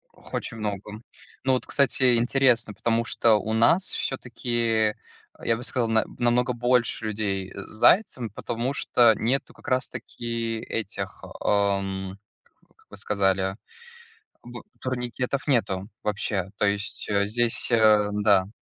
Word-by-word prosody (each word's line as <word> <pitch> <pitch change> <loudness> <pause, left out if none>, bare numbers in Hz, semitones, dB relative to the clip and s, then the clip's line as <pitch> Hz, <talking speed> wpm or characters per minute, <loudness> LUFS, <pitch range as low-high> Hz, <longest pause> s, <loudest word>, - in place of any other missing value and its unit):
Х - - -18
очень 115 - -6
много. 105 0 -5 0.4
Ну 130 - +3
вот, 130 - 0
кстати, 130 -3 +3
интересно, 120 -2 +2
потому 115 +2 0
что 115 -1 +3
у 110 +1 -1
нас 140 +12 +4
всё-таки, 115 -4 -1 0.5
я 115 - +2
бы 120 - -8
сказал, 120 -1 0
на 110 -1 +2
намного 120 +1 +2
больше 120 -1 +1
людей 100 -3 -2
с - - -8
зайцем, 125 - +3
потому 120 +5 -3
что 120 -4 +4
нету 130 +6 -1
как - - -17
раз 130 -1 0
таки 115 -1 -4
этих, 110 -2 -5
эм, 100 -1 -1 0.6
как - - -28
вы - - -12
сказали 95 -1 0 0.9
б 120 0 -9 0.2
турникетов, 125 +1 -3
нету 100 -7 0
вообще, 100 -2 -2
то - - +2
есть, 100 0 -2
э, 100 -1 +2
здесь, 120 +3 +1
э, 110 -2 +5
да. 100 -2 +3
115 Hz, 135 wpm, -25 LUFS, 105-120 Hz, 0.9 s, э